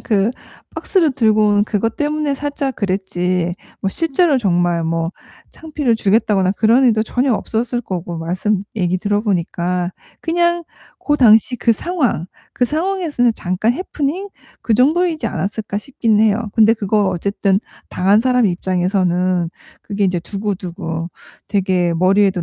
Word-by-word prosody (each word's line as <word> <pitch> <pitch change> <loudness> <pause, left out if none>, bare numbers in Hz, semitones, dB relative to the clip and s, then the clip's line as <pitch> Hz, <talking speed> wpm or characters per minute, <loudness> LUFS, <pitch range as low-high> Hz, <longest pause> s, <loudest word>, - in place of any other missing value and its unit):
그 210 -1 +1 0.5
박스를 345 -7 +2
들고 215 -3 +3
온 205 0 +3
그것 220 +2 -1
때문에 295 -1 -1
살짝 285 -1 -3
그랬지 185 -3 -1 0.3
뭐 195 - 0
실제로 325 - +1
정말 175 -5 +1
뭐 165 +1 -1 0.4
창피를 295 -7 -1
주겠다거나 200 -3 +2
그런 230 +6 +3
의도 220 -3 +3
전혀 245 +2 0
없었을 235 +3 -2
거고 180 -6 -5
말씀 185 +5 -1
얘기 180 -2 +1
들어 205 +2 -1
보니까 180 -2 -1 0.3
'그냥 345 +1 +1 0.4
고 295 - 0
당시 235 -1 +5
그 230 - +2
상황, 255 - -1 0.3
그 250 - +1
상황에서는 315 -6 0
잠깐 185 +6 0
해프닝 340 +4 -3 0.3
그 225 - +1
정도이지 310 +2 +2
않았을까?' 200 +3 -3
싶긴 225 -3 0
해요. 220 0 +2
근데 220 0 +5
그걸 210 -1 +1
어쨌든 195 +2 0 0.3
당한 200 +4 +3
사람 250 -2 +3
입장에서는 180 -1 0 0.3
그게 200 -1 -2
인제 180 -2 0
두고두고 175 -3 -4 0.4
되게 185 -3 +1
머리에도 190 +1 +2
210 Hz, 305 characters per minute, -18 LUFS, 185-250 Hz, 0.5 s, 당시